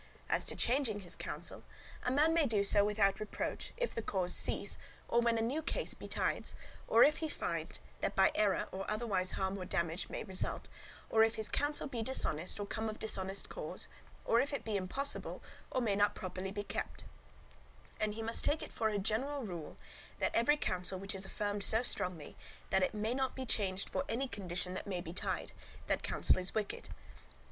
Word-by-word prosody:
As -, -, +2 dB
to -, -, -3 dB
changing 240 Hz, -5 st, +1 dB
his 175 Hz, -, -7 dB
counsel, -, -, -3 dB, 0.4 s
a -, -, 0 dB
man 300 Hz, +5 st, +4 dB
may 325 Hz, -3 st, +4 dB
do 210 Hz, -4 st, +3 dB
so 200 Hz, 0 st, +6 dB
without 205 Hz, -1 st, +3 dB
reproach, 215 Hz, -1 st, -3 dB
if -, -, -1 dB
the 230 Hz, -, -2 dB
cause 185 Hz, -4 st, +1 dB
cease, -, -, +2 dB, 0.3 s
or 235 Hz, -, +3 dB
when 235 Hz, -1 st, +3 dB
a 225 Hz, -, +1 dB
new 270 Hz, +8 st, 0 dB
case 315 Hz, -, -1 dB
betides, -, -, -1 dB, 0.3 s
or 230 Hz, +2 st, +7 dB
if 300 Hz, -, +5 dB
he 315 Hz, -, -2 dB
find -, -, -3 dB, 0.2 s
that -, -, -1 dB
by -, -, +6 dB
error 205 Hz, -2 st, +2 dB
or 190 Hz, +1 st, -4 dB
otherwise 210 Hz, -4 st, +1 dB
harm 190 Hz, +1 st, -1 dB
or 185 Hz, -, -4 dB
damage 170 Hz, -2 st, 0 dB
may -, -, -3 dB
result, 190 Hz, -3 st, 0 dB, 0.4 s
or 220 Hz, 0 st, +6 dB
if 225 Hz, 0 st, +3 dB
his 220 Hz, -, 0 dB
counsel 290 Hz, +1 st, +1 dB
be 245 Hz, -5 st, -3 dB
dishonest 185 Hz, -8 st, +1 dB
or 205 Hz, -, -2 dB
come 220 Hz, +2 st, -2 dB
of 215 Hz, -, -5 dB
dishonest 195 Hz, -2 st, 0 dB
cause, -, -, -5 dB, 0.4 s
or 230 Hz, -, +4 dB
if 280 Hz, -, -1 dB
it 280 Hz, -, -3 dB
be 220 Hz, -2 st, -1 dB
impossible 235 Hz, +9 st, -1 dB, 0.3 s
or 255 Hz, -, 0 dB
may 215 Hz, -4 st, +2 dB
not 205 Hz, +1 st, +3 dB
properly 185 Hz, +1 st, -4 dB
be 205 Hz, +1 st, -3 dB
kept; -, -, -4 dB, 1.0 s
and 210 Hz, -1 st, 0 dB
he 225 Hz, -, -4 dB
must 230 Hz, +1 st, +1 dB
take 300 Hz, -, +2 dB
it -, -, -8 dB
for 220 Hz, -, +1 dB
a 210 Hz, -, 0 dB
general 250 Hz, +8 st, 0 dB
rule, 175 Hz, -7 st, -6 dB, 0.4 s
that -, -, 0 dB
every 295 Hz, +6 st, +5 dB
counsel 185 Hz, -6 st, -1 dB
which 195 Hz, +2 st, -4 dB
is 190 Hz, 0 st, 0 dB
affirmed 205 Hz, +1 st, -2 dB
so 225 Hz, +4 st, +4 dB
strongly, 180 Hz, -10 st, -3 dB, 0.4 s
that 190 Hz, -, +4 dB
it 185 Hz, -, +1 dB
may 215 Hz, +3 st, 0 dB
not 265 Hz, 0 st, 0 dB
be 260 Hz, -, -4 dB
changed 195 Hz, -4 st, 0 dB
for -, -, -1 dB
any 260 Hz, +4 st, 0 dB
condition 180 Hz, -4 st, -2 dB
that 185 Hz, -, -4 dB
may 185 Hz, -3 st, -1 dB
betide, 175 Hz, +1 st, -3 dB, 0.3 s
that -, -, +1 dB
counsel -, -, +3 dB
is 185 Hz, +1 st, 0 dB
wicked. 215 Hz, -2 st, -2 dB
210 Hz, 200 wpm, -35 LUFS, 190-235 Hz, 1.0 s, or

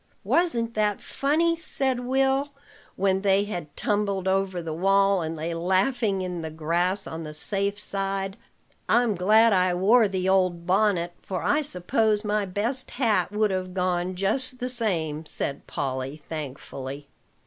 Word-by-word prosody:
"Wasn't 235 Hz, -10 st, +1 dB
that 210 Hz, -2 st, +1 dB
funny?" 325 Hz, +4 st, +1 dB
said 270 Hz, -6 st, -2 dB
Will, 270 Hz, +2 st, +1 dB, 0.5 s
when 190 Hz, 0 st, +1 dB
they 195 Hz, 0 st, +3 dB
had 175 Hz, -8 st, -6 dB
tumbled 205 Hz, -4 st, 0 dB
over 190 Hz, -1 st, +1 dB
the 165 Hz, -2 st, -4 dB
wall, 195 Hz, +2 st, +3 dB
and 160 Hz, 0 st, -3 dB
lay 165 Hz, +2 st, -3 dB
laughing 190 Hz, +4 st, +1 dB
in 180 Hz, -2 st, -4 dB
the 160 Hz, -, -4 dB
grass 170 Hz, +5 st, -1 dB
on 160 Hz, 0 st, -6 dB
the 150 Hz, -1 st, -7 dB
safe 200 Hz, +5 st, -1 dB
side. 195 Hz, -1 st, -2 dB, 0.5 s
"I'm 240 Hz, -2 st, +4 dB
glad 215 Hz, +5 st, +4 dB
I 185 Hz, -1 st, +3 dB
wore 215 Hz, +5 st, +5 dB
the 190 Hz, -1 st, -2 dB
old 185 Hz, -3 st, +2 dB
bonnet; 185 Hz, -2 st, +2 dB
for 185 Hz, -4 st, -4 dB
I 295 Hz, -, +2 dB
suppose 215 Hz, -, 0 dB
my 210 Hz, -1 st, 0 dB
best 230 Hz, +8 st, -2 dB
hat 210 Hz, -8 st, +2 dB
would 210 Hz, 0 st, +1 dB
have 185 Hz, -1 st, -3 dB
gone 180 Hz, 0 st, 0 dB
just 250 Hz, +8 st, 0 dB
the 250 Hz, 0 st, -3 dB
same," 170 Hz, -11 st, -1 dB
said 140 Hz, -1 st, -3 dB
Polly 135 Hz, +1 st, -3 dB
thankfully. 140 Hz, -2 st, -7 dB
195 Hz, 150 wpm, -25 LUFS, 175-220 Hz, 0.5 s, wore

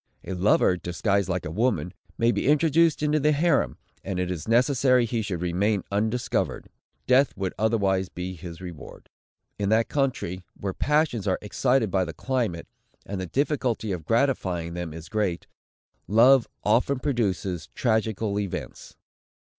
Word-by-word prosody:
A 95 Hz, -, -5 dB
lover, 90 Hz, 0 st, +3 dB
disguised 95 Hz, +2 st, -1 dB
like 90 Hz, -1 st, -2 dB
a 75 Hz, -, -4 dB
woman, 110 Hz, -2 st, 0 dB, 0.2 s
may 115 Hz, +1 st, +3 dB
be -, -, -1 dB
introduced 155 Hz, +1 st, +3 dB
into 150 Hz, 0 st, +2 dB
the 150 Hz, +1 st, +3 dB
harem, 150 Hz, 0 st, +1 dB, 0.3 s
and 95 Hz, -2 st, -3 dB
it 90 Hz, 0 st, -1 dB
is 85 Hz, 0 st, -5 dB
necessary 125 Hz, +1 st, +3 dB
he 115 Hz, 0 st, -1 dB
should 90 Hz, -5 st, -3 dB
remain 95 Hz, +3 st, 0 dB
undiscovered; 110 Hz, +4 st, -1 dB, 0.4 s
death 130 Hz, +1 st, +3 dB
would 95 Hz, -2 st, -2 dB
otherwise 100 Hz, -4 st, +1 dB
be 90 Hz, +1 st, -5 dB
his 85 Hz, 0 st, -9 dB
reward. 90 Hz, -4 st, -10 dB, 0.5 s
In 100 Hz, -1 st, 0 dB
that 110 Hz, +1 st, +2 dB
country, 120 Hz, -10 st, -1 dB
where 95 Hz, -1 st, -3 dB
the -, -, -30 dB
passions 150 Hz, -9 st, +1 dB
are 95 Hz, -, +2 dB
excited 120 Hz, +1 st, +1 dB
by 95 Hz, 0 st, +2 dB
the 85 Hz, -2 st, -5 dB
climate, 120 Hz, -11 st, -2 dB, 0.4 s
and 100 Hz, -1 st, -4 dB
the 95 Hz, -, -4 dB
difficulty 130 Hz, -, -1 dB
of 85 Hz, -4 st, -4 dB
gratifying 95 Hz, -, 0 dB
them 85 Hz, -2 st, -4 dB
is 80 Hz, +1 st, -9 dB
great, 95 Hz, -3 st, -1 dB, 0.6 s
love 120 Hz, +4 st, +5 dB, 0.2 s
often 125 Hz, +6 st, +2 dB
produces 95 Hz, -, -2 dB
tragical 110 Hz, -3 st, 0 dB
events. 100 Hz, -3 st, -6 dB
105 Hz, 155 wpm, -25 LUFS, 90-125 Hz, 0.6 s, love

